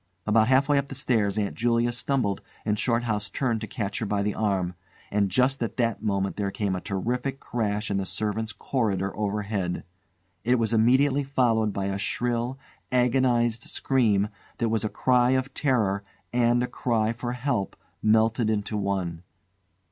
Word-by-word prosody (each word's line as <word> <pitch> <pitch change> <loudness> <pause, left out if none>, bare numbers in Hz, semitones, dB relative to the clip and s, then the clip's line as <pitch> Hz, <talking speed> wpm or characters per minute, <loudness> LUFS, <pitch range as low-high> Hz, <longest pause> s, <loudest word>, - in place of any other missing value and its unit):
About 110 +1 +4
half 130 +2 +4
way 145 -1 +4
up 140 - -3
the 135 - -7
stairs 110 -6 +1
Aunt 100 -2 0
Julia 120 +1 +1
stumbled 120 -4 -1 0.2
and 105 -1 0
Shorthouse 115 -3 0
turned 120 -5 -1
to 110 - -4
catch 100 -1 -3
her 115 - -2
by 100 0 0
the 105 0 0
arm, 95 -4 0 0.4
and 100 -1 +2
just 130 +7 +2
at 115 -3 -3
that 115 -2 0
moment 100 -3 -1
there 100 -1 0
came 100 -1 -1
a 90 - -4
terrific 125 +7 -2
crash 105 -2 -2
in 100 - +1
the 95 - -1
servants' 110 +1 -2
corridor 100 -3 -1
overhead. 100 -3 -2 0.6
It 125 +3 +3
was 115 -1 0
instantly 130 +5 +4
followed 120 -6 +2
by 100 0 -2
a 100 0 -2
shrill, 120 +4 -1 0.3
agonised 125 -2 +2
scream 110 -7 +1 0.3
that 115 - 0
was 110 0 +1
a 110 - 0
cry 125 +2 +3
of 130 +1 -3
terror 110 -8 +1 0.3
and 120 0 +3
a - - -1
cry 115 -3 0
for 120 +1 -4
help 125 -6 -1 0.3
melted 110 +1 +3
into 105 0 -1
one. 95 -5 -2
110 Hz, 170 wpm, -26 LUFS, 100-125 Hz, 0.6 s, About